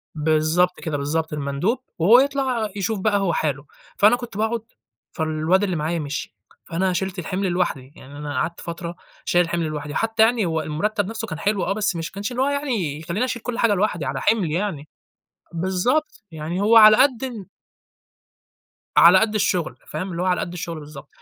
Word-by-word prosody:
بالضبط 155 +3 +1
كده، 155 -4 -2
بالضبط، 155 +3 -2
المندوب، 150 - -1 0.2
وهو 215 +9 +7
يطلَع 265 -5 0
يشوف 200 +1 -1
بقى 205 +1 +2
هو 190 -4 0
حاله. 145 -2 -1 0.3
فأنا 210 +4 +6
كنت 240 -5 -8
باقعد، 220 +2 0 0.5
فالواد 160 +4 +1
اللي 185 -3 0
معايا 160 +2 -1
مشي، 145 0 -5 0.3
فأنا 185 +3 0
شيلت 190 +1 -3
الحِمل 185 +3 -2
لوحدي، 150 -7 -2
يعني 140 +2 -12
أنا 145 -1 -5
قعدت 165 +6 -2
فترة 170 0 -6 0.3
شايل 175 0 +3
الحِمل 170 0 -2
لوحدي، 150 -1 -5
حتى 225 0 +2
يعني 225 -3 +3
هو 160 -1 -1
المرتب 200 +7 -1
نفْسه 225 +1 -5
كان 160 -4 -6
حلو 200 0 0
آه، 195 - 0
بس 200 -3 -1
مش 165 0 -4
ما - - -30
كانش 205 +4 -4
اللي 245 - -2
هو - - +1
يعني 230 - -2
يخليني 175 +9 -2
أشيل 245 -2 -4
كل 245 -1 -4
حاجة 230 -3 +4
لوحدي، 185 -6 0
على - - -3
حِملي 190 -9 +1
يعني، 170 -5 -3 0.7
بالضبط، 190 - -1
يعني 160 +4 -4
هو 220 +3 +4
على 215 -1 +9
قد 265 -3 +3
ال 230 -7 -7 1.5
على - - +8
قد 220 -1 +1
الشغل 180 -5 0
فاهم. 185 +5 -5
اللي 170 0 -3
هو - - -1
على 180 -1 +1
قد 175 - -4
الشغل 170 -2 -5
بالضبط، 145 -1 -11
180 Hz, 190 wpm, -22 LUFS, 160-215 Hz, 1.5 s, على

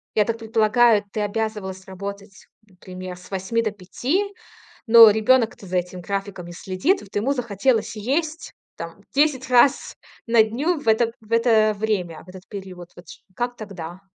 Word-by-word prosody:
я 210 - +4
так 230 0 -2
предполагаю, 225 0 +3
ты 215 - -3
обязывалась 205 -3 -3
работать, 200 +1 -8 0.2
например, 185 -1 -9
с 180 0 -15
8 195 +5 -1
до 215 -2 -1
5, 245 - -2 0.6
но 225 -1 +10
ребенок-то 220 -1 +2
за 180 0 0
этим 180 +1 -5
графиком 195 -1 -4
не 175 - -9
следит. 190 - 0
Вот 200 - -16
ему 240 +7 +1
захотелось 235 -2 0
есть 305 +8 -2 0.2
там 170 +4 -9
10 275 -3 +2
раз 250 +2 +3 0.3
на 230 -1 +5
дню 285 +10 -1
в 230 - -5
это 225 +1 +3
в 215 - -21
это 225 -2 +4
время, 190 -7 -2
в - - -24
этот 185 0 -11
период. 185 -3 -9
Вот 175 - -14
ч - - -12 0.2
как 245 0 -2
тогда? 180 -4 -8
215 Hz, 165 wpm, -22 LUFS, 190-235 Hz, 0.6 s, но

